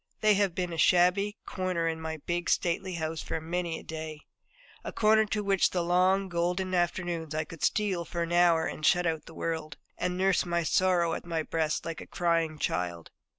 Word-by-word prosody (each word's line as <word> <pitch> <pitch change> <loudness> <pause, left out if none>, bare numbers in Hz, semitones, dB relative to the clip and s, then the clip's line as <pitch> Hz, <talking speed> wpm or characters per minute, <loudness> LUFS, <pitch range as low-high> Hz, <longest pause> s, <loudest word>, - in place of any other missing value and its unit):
They 215 -1 +5
have 200 -3 +1
been 180 -2 -2
a 165 - -4
shabby 180 +5 +3
corner 185 -3 -1
in 160 0 -2
my 160 0 -4
big, 175 0 -1
stately 180 +1 0
house 160 -1 -3
for - - -3
many 170 +1 -3
a - - -10
day 155 -1 -6 0.6
a - - -5
corner 220 0 +4
to 210 0 -1
which 195 -2 +3
in - - -16
the 175 -2 +1
long, 185 +3 +3
golden 180 +1 -1
afternoons 175 -3 -1
I 155 - 0
could 165 0 -12
steal 195 -5 +1
for 170 0 -3
an 170 - -5
hour 170 -2 +4
and 155 - -5
shut 175 +3 +4
out 160 -2 -2
the 165 - -12
world, 160 -3 -4 0.2
and 180 0 -1
nurse 190 0 +2
my 170 -1 -1
sorrow 175 0 +2
at - - -4
my 165 -2 -2
breast 155 -1 -1
like 165 -1 -5
a - - -10
crying 165 -2 0
child. 85 - -3
170 Hz, 205 wpm, -29 LUFS, 160-185 Hz, 0.6 s, They